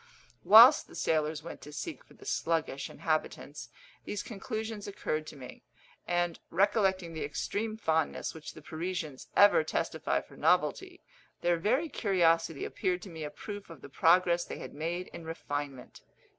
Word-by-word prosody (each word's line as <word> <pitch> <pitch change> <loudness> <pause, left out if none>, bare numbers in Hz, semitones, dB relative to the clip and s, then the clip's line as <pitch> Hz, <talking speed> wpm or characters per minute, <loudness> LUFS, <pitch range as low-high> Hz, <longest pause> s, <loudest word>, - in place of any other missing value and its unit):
Whilst 235 +7 +9
the - - -14
sailors 155 -1 0
went 170 - -8
to 150 - -10
seek 150 - -6
for - - -20
the - - -15
sluggish 160 -5 -1
inhabitants, 155 -1 -3 0.3
these 205 - -4
conclusions 220 0 -5
occurred 155 -6 -3
to - - -9
me; 130 -3 -11 0.5
and, 175 -1 0
recollecting 190 -2 +2
the 160 - -4
extreme 215 +9 -3
fondness 160 -7 0
which 160 -1 -9
the - - -12
Parisians 160 -4 -5
ever 205 -5 +7
testify 155 - -1
for - - -14
novelty, - - +1 0.4
their 175 0 +2
very 255 - +1
curiosity 165 - +1
appeared 180 -1 -2
to 190 - -9
me 160 -1 -7
a 150 - -3
proof 205 +4 -8
of 165 - -11
the - - -9
progress 175 +3 +4
they - - -7
had - - -8
made 170 +4 -3
in 170 - -9
refinement. 145 -5 -5
170 Hz, 155 wpm, -31 LUFS, 155-200 Hz, 0.5 s, Whilst